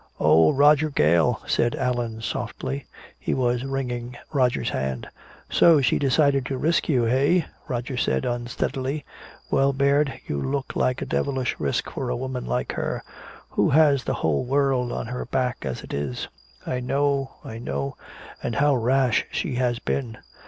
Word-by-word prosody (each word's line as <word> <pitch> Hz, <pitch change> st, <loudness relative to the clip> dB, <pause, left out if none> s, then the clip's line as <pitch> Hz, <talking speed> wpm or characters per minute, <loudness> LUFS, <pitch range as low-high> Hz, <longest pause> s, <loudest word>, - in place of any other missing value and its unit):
"Oh, 80 Hz, +1 st, +5 dB
Roger 150 Hz, +2 st, +5 dB
Gale," 80 Hz, -, +2 dB
said 120 Hz, -, +1 dB
Allan 120 Hz, -3 st, -2 dB
softly. 70 Hz, -9 st, -4 dB, 0.3 s
He -, -, -1 dB
was 125 Hz, -1 st, +1 dB
wringing 125 Hz, -3 st, -3 dB, 0.2 s
Roger's 130 Hz, -4 st, +1 dB
hand. 65 Hz, -2 st, -3 dB, 0.4 s
"So 165 Hz, -3 st, +5 dB
she 130 Hz, -4 st, +2 dB
decided 140 Hz, 0 st, +3 dB
to 135 Hz, -, -2 dB
risk 165 Hz, +6 st, +1 dB
you, 125 Hz, -6 st, +3 dB
eh," 140 Hz, +8 st, +3 dB, 0.2 s
Roger 125 Hz, +1 st, -3 dB
said 125 Hz, -, 0 dB
unsteadily. 130 Hz, +4 st, -2 dB, 0.5 s
"Well, 135 Hz, 0 st, +3 dB
Baird, 140 Hz, +1 st, +2 dB
you 70 Hz, -, -3 dB
look 135 Hz, 0 st, -3 dB
like 130 Hz, 0 st, +1 dB
a -, -, -4 dB
devilish 130 Hz, -2 st, -1 dB
risk 70 Hz, -2 st, -1 dB
for -, -, -3 dB
a -, -, 0 dB
woman 130 Hz, 0 st, -4 dB
like 60 Hz, 0 st, -1 dB
her -, -, -3 dB, 0.5 s
who -, -, +2 dB
has 145 Hz, -2 st, +4 dB
the -, -, -1 dB
whole 80 Hz, -3 st, 0 dB
world 130 Hz, -2 st, +1 dB
on -, -, -3 dB
her 125 Hz, +2 st, -4 dB
back 125 Hz, -1 st, 0 dB
as 65 Hz, -3 st, -4 dB
it -, -, -8 dB
is 70 Hz, -3 st, -3 dB, 0.2 s
" -, -, -29 dB
"I 125 Hz, -, -2 dB
know 140 Hz, +1 st, 0 dB
I 110 Hz, 0 st, -7 dB
know 70 Hz, -9 st, -3 dB, 0.5 s
and 120 Hz, -, -3 dB
how 145 Hz, +1 st, +3 dB
rash 125 Hz, 0 st, +2 dB
she 165 Hz, -8 st, -2 dB
has 125 Hz, -2 st, +1 dB
been! 120 Hz, -3 st, -3 dB
125 Hz, 165 wpm, -24 LUFS, 115-140 Hz, 0.5 s, Oh